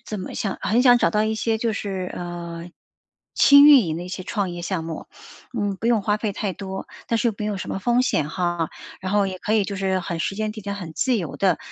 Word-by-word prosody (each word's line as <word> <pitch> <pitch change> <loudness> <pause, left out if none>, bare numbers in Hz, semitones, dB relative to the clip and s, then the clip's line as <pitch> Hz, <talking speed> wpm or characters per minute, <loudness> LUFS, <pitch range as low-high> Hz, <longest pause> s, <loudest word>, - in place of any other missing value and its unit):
怎 215 - -4
么 185 - -6
想 195 -3 -2
很 235 +3 +2
想 245 -1 +7
找 - - +2
到 215 0 +2
一 220 - 0
些 220 0 0
就 230 -1 0
是， 190 -3 -4
呃， 175 -1 -6 0.6
轻 285 0 +8
运 285 -4 +9
营 160 0 -2
的 175 - -5
一 - - -8
些 185 0 -5
创 200 -3 -2
业 175 0 -6
项 180 -1 -2
目， 165 -1 -6 0.5
嗯， 200 -2 -1
不 225 - -4
用 230 -4 +3
花 210 0 +1
费 210 -1 -2
太 195 0 -3
多， 190 0 -7 0.2
但 230 - +1
是 235 0 +2
又 220 - -2
没 210 - -3
有 205 -2 -2
什 - - -6
么 - - -2
风 240 +5 +2
险 150 - 0
哈， 175 -1 -1 0.3
然 185 +1 -3
后 205 -1 +3
也 185 -1 -6
可 210 - -2
以 210 - +3
就 200 0 -4
是 190 -1 0
很 170 -1 -4
时 195 - -2
间 215 +1 -2
地 215 - -8
点 200 0 -4
很 175 -5 -7
自 250 +8 +1
由 170 -9 -4
的， 185 -4 +2
200 Hz, 280 characters per minute, -23 LUFS, 180-220 Hz, 0.6 s, 运